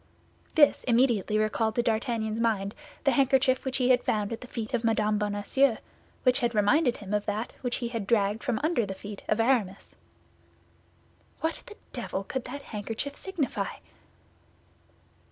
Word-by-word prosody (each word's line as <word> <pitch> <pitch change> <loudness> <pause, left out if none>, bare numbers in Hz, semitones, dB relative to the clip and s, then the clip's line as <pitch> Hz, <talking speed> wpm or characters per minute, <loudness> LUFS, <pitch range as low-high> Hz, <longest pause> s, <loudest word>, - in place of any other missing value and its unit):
This 295 -3 +5
immediately 235 -4 +3
recalled 215 +1 +1
to 240 - +2
D'Artagnan's 225 -1 -1
mind 210 -3 0 0.3
the 275 - +4
handkerchief 265 -1 +3
which 265 -1 -1
he 255 -1 +2
had 250 -1 +4
found 210 0 0
at 225 - -6
the 250 - -9
feet 230 0 -5
of 240 -1 0
Mme. 215 -2 +2
Bonacieux, 210 +5 +2 0.5
which 255 0 +4
had 240 -3 0
reminded 245 +6 +3
him 205 -1 -7
of 210 0 0
that 215 +3 -2
which 245 -2 -1
he 235 - -3
had 230 -4 -4
dragged 210 -1 +2
from 245 -5 0
under 315 -6 +2
the 195 -2 -4
feet 205 +1 -8
of 215 - +2
Aramis. 225 -5 0 1.5
"What 320 +1 -1
the 430 - -10 0.2
devil 195 - -3
could 260 +5 -4
that 280 +3 -7
handkerchief 225 +6 -4
signify?" 350 -8 -2
230 Hz, 160 wpm, -28 LUFS, 210-260 Hz, 1.5 s, This